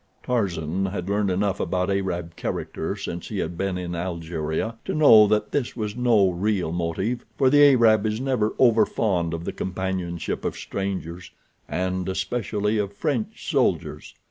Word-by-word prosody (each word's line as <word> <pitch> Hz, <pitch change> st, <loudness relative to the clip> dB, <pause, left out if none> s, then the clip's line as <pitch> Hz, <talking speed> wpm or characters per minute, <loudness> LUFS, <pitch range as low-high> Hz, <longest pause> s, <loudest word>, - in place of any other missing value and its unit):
Tarzan 95 Hz, -6 st, -1 dB
had 95 Hz, -2 st, -4 dB
learned 100 Hz, 0 st, +1 dB
enough 95 Hz, +1 st, 0 dB
about 90 Hz, +1 st, 0 dB
Arab 90 Hz, -4 st, -2 dB
character -, -, -3 dB
since 85 Hz, 0 st, -6 dB
he 105 Hz, -, -5 dB
had 85 Hz, -2 st, -2 dB
been 95 Hz, +1 st, -2 dB
in 90 Hz, -1 st, -4 dB
Algeria 85 Hz, +4 st, -3 dB
to -, -, -3 dB
know 115 Hz, -9 st, +7 dB
that 105 Hz, 0 st, +1 dB
this 140 Hz, -4 st, -1 dB
was 105 Hz, -3 st, -3 dB
no 115 Hz, -6 st, +3 dB
real 95 Hz, -1 st, -1 dB
motive, 90 Hz, +8 st, -2 dB
for 130 Hz, -2 st, +4 dB
the 145 Hz, 0 st, +6 dB
Arab 110 Hz, -3 st, +4 dB
is 110 Hz, +1 st, -2 dB
never 125 Hz, -5 st, 0 dB
overfond 110 Hz, -7 st, +2 dB
of 85 Hz, 0 st, -4 dB
the -, -, -3 dB
companionship 95 Hz, -2 st, -3 dB
of -, -, -2 dB
strangers, 95 Hz, -3 st, -5 dB, 0.4 s
and 95 Hz, 0 st, -2 dB
especially 105 Hz, +1 st, -1 dB
of 100 Hz, -1 st, -2 dB
French 210 Hz, -, -3 dB
soldiers. 85 Hz, -, 0 dB
95 Hz, 155 wpm, -24 LUFS, 90-110 Hz, 0.4 s, know